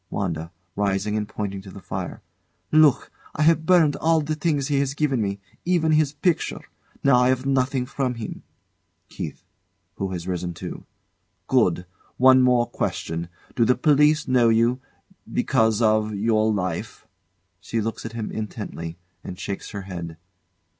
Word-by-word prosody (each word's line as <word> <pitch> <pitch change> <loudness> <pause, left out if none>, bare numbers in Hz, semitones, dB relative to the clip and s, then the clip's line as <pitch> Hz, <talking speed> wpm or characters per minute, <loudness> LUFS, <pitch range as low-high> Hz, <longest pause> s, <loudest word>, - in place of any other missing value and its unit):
WANDA. 85 -4 -3 0.2
[Rising 100 +1 0
and 105 -1 -2
pointing 100 -3 -4
to 95 - -12
the 100 - -10
fire] - - -6 0.5
Look! 155 -4 +4 0.2
I 155 - +1
have 160 0 +3
burned 170 -5 +5
all 165 0 +3
the 155 +1 -2
things 150 -3 0
he 140 -2 +1
have 140 0 -1
given 140 -6 +1
me 100 -1 -2 0.2
even 170 -3 +2
his 155 -2 +3
picture. 155 +3 0 0.4
Now 140 -3 +5
I 125 0 +4
have 130 0 0
nothing 130 -1 +1
from 130 -1 -2
him. 115 -2 -6 0.7
KEITH. - - -7 0.5
[Who 95 - -2
has 90 -1 -5
risen 90 -1 -3
too] - - -7 0.6
Good! 90 - +2 0.3
One 130 0 +7
more 125 -2 +4
question. 85 -6 -3 0.3
Do 120 - +3
the 125 +2 +4
police 150 +2 +3
know 125 -3 +4
you 115 +3 +2 0.5
because 110 0 +2
of 110 -1 +2
your 110 +1 +2
life? 95 0 -3 0.5
[She 115 +3 -3
looks 110 0 -3
at 115 - -6
him 115 -2 -4
intently, 100 -6 -6 0.3
and 90 - -7
shakes 100 -1 -5
her, 100 -2 -6
head. 85 -4 -7
115 Hz, 155 wpm, -24 LUFS, 100-140 Hz, 0.7 s, One